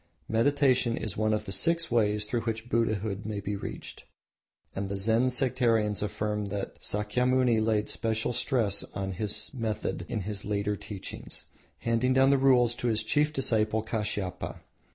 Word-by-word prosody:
Meditation 130 0 +2
is 110 - -4
one 110 0 +1
of 105 0 0
the - - -6
six 165 - +2
ways 105 -2 +2
through 115 +2 -1
which 115 +1 -4
Buddhahood 110 -3 0
may 105 -1 -3
be 100 +1 -3
reached, 100 - -7 0.7
and 100 0 -3
the 100 - -2
Zen 115 +5 +3
sectarians 120 -5 +1
affirm 105 0 -2
that 100 0 -5
Sakyamuni 120 +2 +1
laid 110 -1 +1
special 115 +1 -1
stress 115 -5 +2
on 95 -1 -3
this 105 +3 -3
method 110 -4 -3
in 110 - -2
his 100 +1 -4
later 105 0 -1
teachings, 100 -1 -6 0.4
handing 115 +2 +1
down 135 +1 +5
the 140 - +4
rules 125 -3 +4
to 120 - -3
his 110 -1 +1
chief 150 +7 +2
disciple 110 -6 +1
Kashiapa. 105 -5 -3
110 Hz, 155 wpm, -28 LUFS, 105-125 Hz, 0.7 s, down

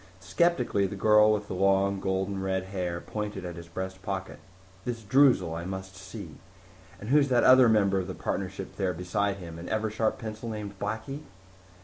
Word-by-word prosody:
Skeptically 100 - +1
the 100 - -6
girl 105 +1 +5
with 105 -1 -1
the - - -5
long, 100 +1 +2
golden 95 +1 -1
red 95 -1 -1
hair 90 -3 -3
pointed 105 -1 -5
at 90 -1 -5
his 85 -1 -9
breast 95 +2 -6
pocket. 95 -1 -5 0.4
"This 120 -2 -4
Droozle 115 - +4
I 85 +1 -4
must 95 +1 -6
see. 95 -4 -9 0.6
And 105 - -7
who's 145 -1 +5
that 125 -2 +3
other 130 -2 +7
member 100 -3 +3
of 90 - -4
the 95 - -5
partnership 95 0 -4
there 95 -3 0
beside 95 +3 -1
him? 85 -3 -9
An 85 - -7
Eversharp 110 0 0
pencil 110 +1 -6
named 105 -2 -6
Blackie?" 110 +7 -4
100 Hz, 180 wpm, -28 LUFS, 95-110 Hz, 0.6 s, other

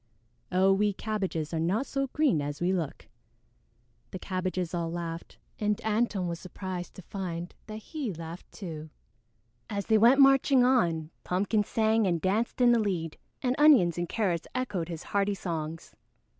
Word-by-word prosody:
Oh, 190 +1 +4
we 205 +1 +2
Cabbages 190 -7 -3
are 165 - 0
not 190 +11 +1
so 275 -1 -2
green 270 - +2
as 145 0 -4
we 180 +2 +1
look!" 165 -6 -3 1.0
The - - -6
Cabbages 185 -1 -3
all 170 -1 -1
laughed, 170 -1 -6 0.2
and 210 -1 0
Antone 215 -4 +1
was 170 -1 -4
surprised 185 -1 -6
to 190 - -10
find 175 -2 -5
that 215 - -6
he 265 +2 -5
laughed 165 0 -9
too. 160 -5 -7 0.8
As 200 -1 -3
they 220 -1 +4
went 240 +5 +6
marching 270 -1 +6
on, 170 -11 +2
Pumpkin 205 +4 +1
sang 220 0 +2
and 170 -2 +1
danced 215 +8 0
in 245 -1 +6
the 235 - +4
lead, 180 -7 -2 0.2
and 250 0 +1
Onions 260 - +6
and 175 -1 -2
Carrots 180 -7 -1
echoed 195 -10 -2
his 165 -2 -6
hearty 200 0 0
songs. 165 -3 -5
190 Hz, 160 wpm, -29 LUFS, 170-220 Hz, 1.0 s, went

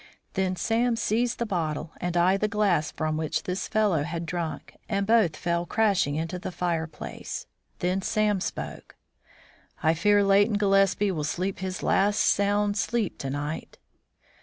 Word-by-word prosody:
Then 190 -1 0
Sam 230 +6 +1
seized 230 +2 0
the 235 - -1
bottle 165 -6 -2
and 175 0 -1
I 180 +2 +4
the 210 +2 0
glass 205 -8 +1
from 155 -1 -2
which 155 -1 -1
this 180 +1 -3
fellow 210 -8 +2
had 170 +3 -3
drunk, 170 -1 -4
and 200 -2 0
both 215 -7 +3
fell 170 0 -1
crashing 200 -10 +2
into 165 +3 -3
the 185 - -5
fireplace. 160 - -4 0.3
Then 185 +2 0
Sam 210 -1 +1
spoke: - - -5 0.9
"I 160 0 +4
fear 205 +5 +3
Leighton 205 +2 +4
Gillespie 195 0 +3
will 155 -5 -2
sleep 185 +6 -2
his 185 -1 -4
last 205 +2 +2
sound 205 +1 +2
sleep 225 0 -1
to 135 - -3
night." 145 +3 -4
190 Hz, 155 wpm, -26 LUFS, 165-205 Hz, 0.9 s, I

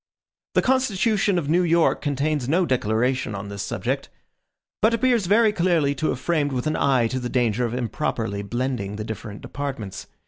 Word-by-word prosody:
The - - +4
constitution 215 -6 +2
of 160 -5 -1
New 170 +4 +3
York 170 -1 +3
contains 145 -2 -1
no 175 +4 +3
declaration 125 -2 0
on 100 +1 -6
this 100 -1 -5
subject; - - -3 0.7
but 220 +2 +4
appears 230 -4 +2
very 215 +2 +4
clearly 170 -7 +2
to 155 +3 -2
have - - 0
been 130 - -15
framed 150 -5 +1
with 125 -1 -2
an 155 - 0
eye 130 -4 +3
to 130 +3 -1
the 125 -1 -4
danger 120 -1 +1
of 120 +1 -3
improperly 115 -4 -2
blending 120 -2 -3
the 110 - -4
different 110 -1 -7
departments. 135 -9 -5
135 Hz, 180 wpm, -23 LUFS, 115-175 Hz, 0.7 s, The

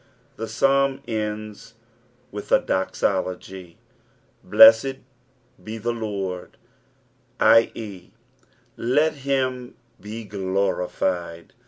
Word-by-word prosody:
The 115 - -5
Psalm 135 +1 +1
ends 110 0 -5 0.6
with 105 0 -8
a - - +6
dosologf. 95 -1 -2 0.7
"Slewed 275 +9 +8
it 135 0 -5 0.6
the 110 +2 -4
Lord," 100 -5 -5 0.8
i.e., 110 -5 +2 0.7
let 150 +6 +1
him 130 -2 -2 0.3
be 110 +2 -7
glorified. 95 -3 -2
110 Hz, 75 wpm, -23 LUFS, 95-130 Hz, 0.8 s, Slewed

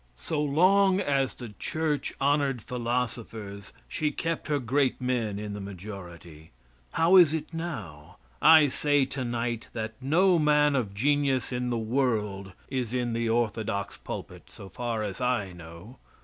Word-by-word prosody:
So 150 - -2
long 185 +6 +4
as 135 -6 0
the 120 -2 -8
church 155 -2 -1
honored 140 -2 +2
philosophers 115 -5 -4 0.2
she 155 - -1
kept 165 +2 -3
her 150 -1 +1
great 130 +1 +1
men 120 -5 -1
in 105 0 -5
the 100 - -6
majority. 90 -5 -9 0.4
How 170 +4 +5
is 165 -4 +7
it 160 +1 -5
now? 95 - -6 0.2
I 160 -1 +8
say 145 0 +2
tonight 120 -3 -3
that 110 -1 -4
no 170 +6 +3
man 150 -1 +4
of 105 -7 -1
genius 135 +1 +1
in 125 0 -2
the 120 - 0
world 110 -5 -1
is 125 -2 -3
in 120 -2 -1
the 115 0 -1
orthodox 110 -4 -1
pulpit, - - -8
so 95 - -11
far 115 +2 -3
as 100 +3 -5
I 120 -7 0
know. 85 +8 -12
125 Hz, 150 wpm, -27 LUFS, 105-145 Hz, 0.4 s, I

